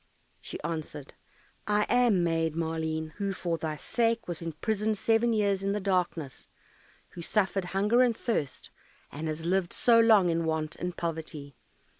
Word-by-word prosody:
She - - -7
answered, 155 -3 -5 0.5
"I 210 0 +3
am 240 -7 +3
Maid 165 -2 0
Maleen, 160 -1 -2
who 200 -1 -1
for 170 -3 -2
thy 155 -1 -3
sake 230 +6 0
was 175 -1 -4
imprisoned 210 +6 -1
seven 225 +3 +2
years 200 -3 +1
in 195 0 0
the 210 - -1
darkness, 180 -7 -1 0.6
who 170 - -9
suffered 195 +1 0
hunger 205 +7 +2
and 240 -3 +3
thirst, 150 - -3 0.4
and 155 +3 -5
has 155 +1 -4
lived 180 0 0
so 235 -2 +4
long 215 -6 +5
in 165 0 0
want 160 -1 -2
and 180 0 -5
poverty. 155 -4 -5
175 Hz, 155 wpm, -29 LUFS, 160-210 Hz, 0.6 s, long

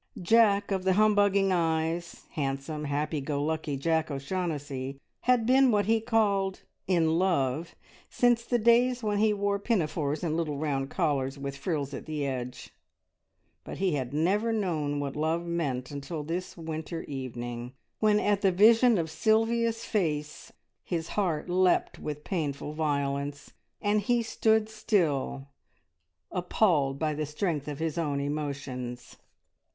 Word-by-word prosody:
Jack 205 +1 +4
of 190 -1 0
the 190 0 +3
humbugging 205 -1 +4
eyes, 165 0 -1
handsome, 145 +1 -3
happy 150 +1 -1
go 145 +1 -2
lucky 155 -2 -2
Jack 160 +3 0
O'Shaughnessy, 140 -3 -4 0.3
had 250 -2 +3
been 260 +2 +5
what 205 -3 +2
he 225 +1 +2
called 205 -4 +1 0.2
"in 165 -3 +2
love" 165 -4 0 0.3
since 240 -1 +3
the 240 +1 +1
days 240 +2 +3
when 205 -1 0
he 215 0 +4
wore 200 -1 0
pinafores 155 -8 -1
and 160 -2 0
little 155 -4 -1
round 140 -2 -1
collars 140 -6 0
with 140 0 -5
frills 140 -1 -3
at - - -7
the 150 -2 -2
edge, 125 -2 -5 0.9
but - - -7
he 190 -3 +1
had 130 -3 -2
never 195 +10 +1
known 160 -9 -1
what 140 -1 -3
love 160 +3 0
meant 145 -7 -2
until 145 +2 -5
this 175 +5 -4
winter 160 0 -5
evening, 120 -3 -5 0.3
when 210 -1 +4
at 205 -1 +1
the 195 - +4
vision 225 +5 +6
of 165 -2 0
Sylvia's 225 +5 +1
face 150 -7 -2 0.3
his 165 -2 -3
heart 175 -7 -1
leapt 180 0 +2
with 150 0 -5
painful 150 -5 -3
violence, 140 -2 -2 0.3
and 205 0 +1
he 240 +3 +1
stood 220 -1 +2
still 165 -11 0 0.8
appalled 175 -7 +1
by 155 +1 0
the 150 0 -3
strength 150 -1 -2
of 145 -2 -4
his 160 +1 -2
own 145 -4 -1
emotions. 135 -4 -4
160 Hz, 145 wpm, -28 LUFS, 145-205 Hz, 0.9 s, vision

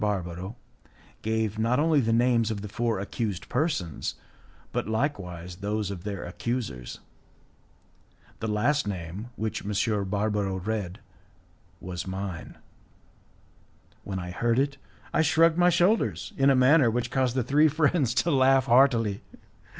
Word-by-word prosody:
Barbaro, 95 0 -3 0.7
gave 110 -1 -1
not 120 +4 +2
only 155 -1 +3
the 115 -4 +1
names 115 -1 +3
of 105 -2 -4
the - - -4
four 115 0 -1
accused 100 -1 -3
persons, 125 - -1 0.6
but - - -2
likewise 90 - -3
those 105 +1 -2
of 90 -3 -7
their 100 -3 -4
accusers. 90 - -4 1.4
The 110 - -3
last 115 +5 +1
name, 95 +3 -5
which 110 -1 -3
M. 105 0 0
Barbaro 100 -1 0
read, 100 -1 -3 0.8
was 90 -1 -6
mine. 95 -2 -5 1.5
When 95 -2 -4
I 90 -1 -5
heard 115 +5 0
it, 140 +1 +1 0.4
I - - +3
shrugged 165 +2 +4
my 175 0 +6
shoulders 175 - +1
in 135 0 +4
a 135 - +5
manner 130 0 +5
which 120 +1 -2
caused 130 -2 +1
the 130 - +1
three 145 +6 +4
friends 150 -4 +1
to 170 - 0
laugh 135 -1 +4
heartily. 115 -5 +3
110 Hz, 135 wpm, -27 LUFS, 100-130 Hz, 1.5 s, my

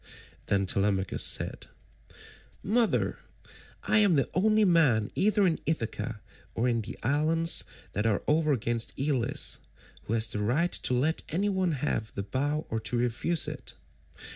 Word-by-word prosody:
Then 100 -1 +1
Telemachus 95 -1 +1
said, - - +1 1.0
"Mother, 225 +3 +1 0.6
I 215 - +3
am 200 -5 +4
the 135 - +2
only 215 +3 +3
man 150 - +3
either 205 0 +2
in 170 -3 +1
Ithaca 115 -7 -3 0.3
or 120 - 0
in 115 -2 +1
the 105 - -8
islands 155 +6 +2 0.3
that 105 +3 0
are 105 -3 0
over 155 0 +2
against 120 -2 -1
Elis 140 0 0 0.5
who 110 - -3
has 115 -1 +4
the 110 -2 -4
right 135 +12 +1
to 125 - 0
let 150 +6 +1
any 195 +6 0
one 190 -4 0
have 125 -6 -3
the 100 - -3
bow 145 +9 -2
or 115 - -1
to 120 +2 -2
refuse 125 +8 0
it. - - -6
135 Hz, 150 wpm, -28 LUFS, 115-165 Hz, 1.0 s, am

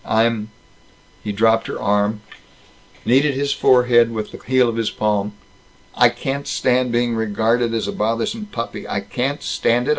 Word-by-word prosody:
I'm 110 -1 +1 0.4
" 90 0 -31
He 105 - -3
dropped 115 +2 +2
her - - -5
arm, 105 +1 0 0.8
kneaded 135 +3 +3
his 140 +1 0
forehead 125 -3 +4
with 110 -2 -5
the - - -10
heel 130 -1 +2
of 115 - -2
his 115 -2 0
palm. 105 -1 -1 0.6
"I - - +5
can't 140 +1 -4
stand 130 -3 +1
being 120 0 +1
regarded 115 +2 0
as 110 - -2
a - - -2
bothersome 115 - -2
puppy. 115 - -6
I 100 - -2
can't 125 +8 -3
stand 120 +2 0
it! - - -1
115 Hz, 170 wpm, -20 LUFS, 110-125 Hz, 0.8 s, I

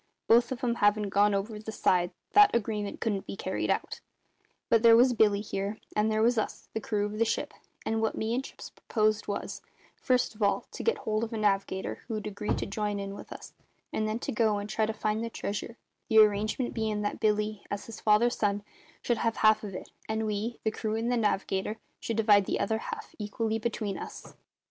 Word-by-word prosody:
Both 235 +2 +5
of 260 +1 -4
'em 235 -1 +1
havin' 205 0 +3
gone 205 +1 +3
over 210 +2 -3
the 220 +1 -6
side, 180 -4 +2 0.2
that 415 -6 +7
agreement 210 -3 -2
couldn't 205 -4 -2
be - - -5
carried 190 0 -2
out; - - -1 0.7
but 230 - +4
there 230 -1 +8
was 250 +1 +5
Billy, 210 -3 +3
here; 200 0 -3 0.2
and 210 +1 +2
there 215 0 +2
was 235 0 +3
us, - - -4
the 220 - -2
crew 205 -1 0
of 210 +1 -5
the - - +5
ship; 225 - -2 0.3
and 225 0 0
what 220 - 0
me 220 +1 -1
and 255 +2 0
Chips - - -10
proposed 215 -2 0
was, 205 - -4 0.3
first 250 -2 +1
of 215 - -15
all, 200 -1 +2
to - - -6
get 460 - +1
hold 215 +1 -1
of 230 - -4
a - - -2
navigator 195 -2 0
who'd 215 -3 -4
agree 210 0 -2
to - - -3
join 205 0 -2
in 195 0 -5
with - - -10
us, - - -9 0.4
and 215 - 0
then 215 +1 -1 0.2
go 215 -2 +2
and 205 +1 -5
try 220 -1 +1
to - - 0
find 215 +1 -1
the 230 - -3
treasure; 220 +2 -5 0.3
the 220 -3 +2
arrangement 215 +3 +4
bein' 215 -2 -1
that 205 - -2
Billy, 210 -1 0
as 205 - -4
his 225 -1 -9
father's 220 +3 +4
son, 205 -1 0 0.4
should 240 -2 +1
have 230 -1 0
half 215 0 +4
of 200 -3 -6
it, - - -8 0.2
and 220 0 0
we 215 +3 -2
the 220 - +1
crew 215 0 -2
and 230 +2 -1
the - - +2
navigator 210 -1 0 0.2
should 230 - -3
divide 210 -3 +5
the - - 0
other 220 -1 0
half - - -7
equally 220 +1 -2
between 215 -3 -2
us. - - -9
215 Hz, 215 wpm, -29 LUFS, 205-225 Hz, 0.7 s, there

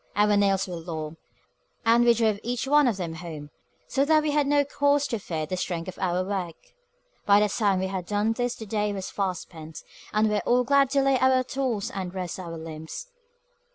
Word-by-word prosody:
Our 210 +1 +4
nails 195 -1 +2
were 180 -2 -5
long, 160 -1 -6 0.7
and 230 +1 +5
we 235 -1 +5
drove 220 -3 +1
each 245 +2 -2
one 295 0 +5
of 225 -5 0
them 170 -4 -4
home, 160 -4 -8 0.4
so 275 - +1
that 310 +1 +4
we 300 - 0
had 290 -1 +2
no 285 0 +3
cause 285 0 +2
to 230 - -2
fear 160 -5 -3
the 185 - -3
strength 175 -2 -3
of - - -10
our 180 -1 0
work. 185 -4 -3 0.7
By 200 0 +7
the 210 - +3
time 200 -2 +1
we 190 - -1
had 190 -2 -4
done 210 +2 +1
this 245 +1 -2
the 220 - -8
day 210 0 -1
was 190 -2 -5
far 195 -2 -1
spent, 160 -2 -10 0.3
and 215 +1 +2
we 210 - 0
were 210 - +2
all 250 +1 +3
glad 275 +1 +4
to 275 -1 +3
lay 270 -1 +3
by 260 +1 +4
our 255 0 +3
tools 255 -5 -2
and 185 -1 -5
rest 185 0 -4
our 170 -2 -6
limbs. 160 - -8
205 Hz, 225 wpm, -26 LUFS, 180-250 Hz, 0.7 s, By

